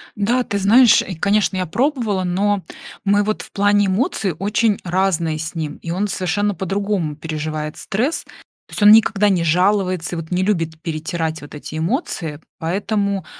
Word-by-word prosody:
Да, 235 +5 +1
ты 205 - -3
знаешь, 225 +4 +6
и, 185 - -6
конечно, 200 +3 +1
я 185 - -1
пробовала, 225 - 0
но 195 +2 0 0.4
мы 205 +1 +3
вот 215 +1 -2
в - - -12
плане 205 0 +3
эмоций 195 - 0
очень 205 +2 +1
разные 175 -3 0
с 160 +2 -5
ним 155 -2 -4
и 165 - -6
он 195 +4 -1
совершенно 205 +2 -1
по-другому 195 -4 -2
переживает 155 0 -4
стресс. 250 +11 -1 0.4
То - - -17
есть - - -1
он 205 - +9
никогда 210 -2 +5
не 180 -4 +1
жалуется 180 +1 +1
и 165 - -5
не 180 +1 +1
любит 165 -5 -1
перетирать 160 0 -3
вот 145 +1 -11
эти 150 +1 -7
эмоции. 165 - -2 0.2
Поэтому 200 +2 -1
190 Hz, 165 wpm, -19 LUFS, 165-205 Hz, 0.4 s, он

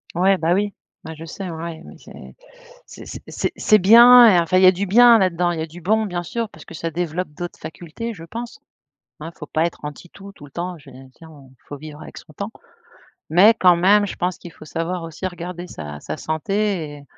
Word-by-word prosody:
Ouais, 190 +2 +3
bah, 165 +1 +1
oui, 205 +1 -1 0.3
bah 160 - -8
je 160 - -10
sais 185 +3 -7
ouais 165 0 -7
mais - - -13
c'est - - -14 0.5
c'est - - -12
c - - -8
c'est - - -3
c'est 215 - +4
bien 235 +5 +8
et 185 -5 +5
enfin 170 +2 +1
il 185 - +4
y - - +8
a 185 - +8
du 190 +2 -3
bien 235 +3 +7
là-dedans 175 -2 +1
il 170 - -4
y - - -2
a 160 - -4
du 170 +3 -13
bon 220 +5 +1
bien 175 -2 -4
sûr 230 +5 -4
parce - - -15
que - - -12
ça 165 +1 -4
développe 175 +1 -3
d'autres 175 +4 -8
facultés 175 +9 -7
je 165 - -11
pense. 230 +8 -8 0.6
Hein 165 +2 -7
il - - -28
faut 150 - -8
pas 155 +1 -1
être 170 -3 -4
anti 150 +4 -9
tout, 200 +3 -13
tout 145 - -17
le 140 - -17
temps. 175 +3 -5
Je 145 - -16
tu 125 - -14 0.2
sais 165 - -13
on 145 -5 -16 0.2
faut 145 - -8
vivre 150 +1 -11
avec - - -11
son 155 - -14
temps, 200 +7 -6 0.8
mais 190 +8 +6
quand 180 -2 +6
même 200 +4 +3
je - - -6
pense 180 +1 -3
qu'il 175 - -11
faut 155 - -15
savoir 165 +3 -4
aussi 165 +3 -5
regarder 175 0 -8
sa 75 - -8
sa - - -6
santé 170 0 -2
et 145 - -13
175 Hz, 245 wpm, -21 LUFS, 160-195 Hz, 0.8 s, bien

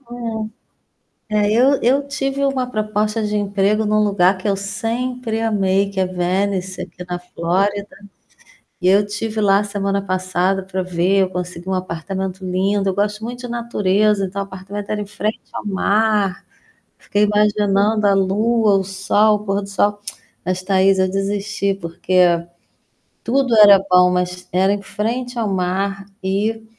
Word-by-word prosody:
Hum. 275 - -33 1.2
É, 210 -1 +1
eu 265 +5 +4
eu 275 +4 +2
tive 275 -1 -2
uma 265 -2 0
proposta 215 0 -1
de 210 0 -1
emprego 205 +1 +1
em 210 - -1
um 215 - +3
lugar 195 -2 +3
que 205 - -3
eu 195 - +1
sempre 225 +3 -3
amei, 200 -3 +1
que 195 -1 -3
é 185 - +2
Venice 185 +1 -2
aqui 180 0 -9
na 175 0 -3
Flórida. 195 +4 -2 0.9
E 180 - +1
eu 195 +2 +6
estive 215 +1 -3
lá 200 0 +4
semana 200 -1 -2
passada 185 0 0
para 190 0 -3
ver, 185 +2 +1
eu 190 - +1
consegui 180 -1 -6
um 190 - 0
apartamento 185 +1 -4
lindo, 195 +2 0
eu 190 - -1
gosto 210 +1 -1
muito 245 +1 -5
de 245 - -6
natureza, 210 -4 +1
então 195 +2 -4
apartamento 195 +1 -8
era 210 - -1
em - - -4
frente 215 +1 -3
ao - - -6
mar. 205 -1 +1 0.5
Fiquei 205 +1 0
imaginando 210 0 +2
a 200 - +4
lua, 210 +3 +2
o 195 - +1
sol, 200 +3 +2
o - - -11
pôr 200 +1 0
do 200 - -8
sol. 205 +1 +1 0.4
Mas 185 +1 -2
Thaís, 195 0 +3
eu 185 0 +2
desisti 200 0 -1
porque, 175 -1 +1 0.8
tudo 255 -1 +1
era 205 -2 +9
bom, 180 0 +5
mas 180 0 -2
era 190 +3 +2
em 205 - -3
frente 240 +5 -3
ao 225 - 0
mar 195 +1 -1 0.2
e 215 +4 -1
200 Hz, 160 wpm, -19 LUFS, 185-215 Hz, 1.2 s, era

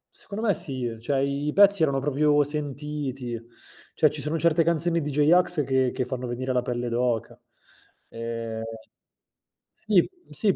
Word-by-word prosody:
Secondo 220 +2 -5
me 205 - +4
sì, 130 -5 -2
ehm, 115 -1 -4
cioè 135 +3 0
i 140 +2 -1
pezzi 200 -3 +6
erano 140 -3 +2
proprio 145 +1 +3
sentiti; 145 -4 -4 0.5
cioè 155 - +4
ci 150 -1 -6
sono 155 +3 -2
certe 165 0 +3
canzoni 170 +1 +1
di 150 -1 -3
J-Ax 160 +3 +3
che 130 -1 +1
che 130 - -2
fanno 125 0 -4
venire 125 +2 -3
la 125 -1 +1
pelle 120 0 -2
d'oca. 120 -2 -1 0.7
Ehm 115 -1 -5 1.1
sì, 210 -5 +2 0.2
sì 210 -4 +2
140 Hz, 155 wpm, -25 LUFS, 125-155 Hz, 1.1 s, pezzi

